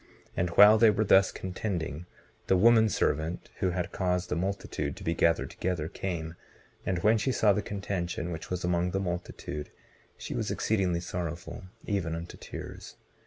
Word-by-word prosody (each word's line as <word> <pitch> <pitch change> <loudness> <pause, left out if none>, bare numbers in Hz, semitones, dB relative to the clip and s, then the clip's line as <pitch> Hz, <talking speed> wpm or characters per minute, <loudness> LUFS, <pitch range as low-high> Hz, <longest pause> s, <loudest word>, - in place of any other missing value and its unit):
And 90 0 0
while 105 +1 +9
they 115 0 +7
were 105 +1 +2
thus 95 -2 +5
contending, 90 -4 -4 0.4
the 95 - +4
woman 110 +2 +6
servant 80 -2 -1
who 95 - +1
had 90 -1 -2
caused 90 -1 -1
the - - 0
multitude 95 +4 -3
to - - -10
be 85 - 0
gathered 85 0 +2
together 90 -4 -2
came, 85 -3 -4 0.5
and 90 - +1
when 110 +1 +4
she 120 +6 0
saw 105 -4 +4
the 105 - 0
contention 90 -4 -3
which 80 -1 -6
was 90 -1 -3
among 90 0 +1
the 95 +2 -1
multitude 85 -5 -4 0.5
she - - -6
was - - -2
exceedingly 95 -5 0
sorrowful, 85 0 -5 0.2
even 90 -5 -1
unto 85 +1 -7
tears. - - -9
90 Hz, 165 wpm, -29 LUFS, 85-100 Hz, 0.5 s, while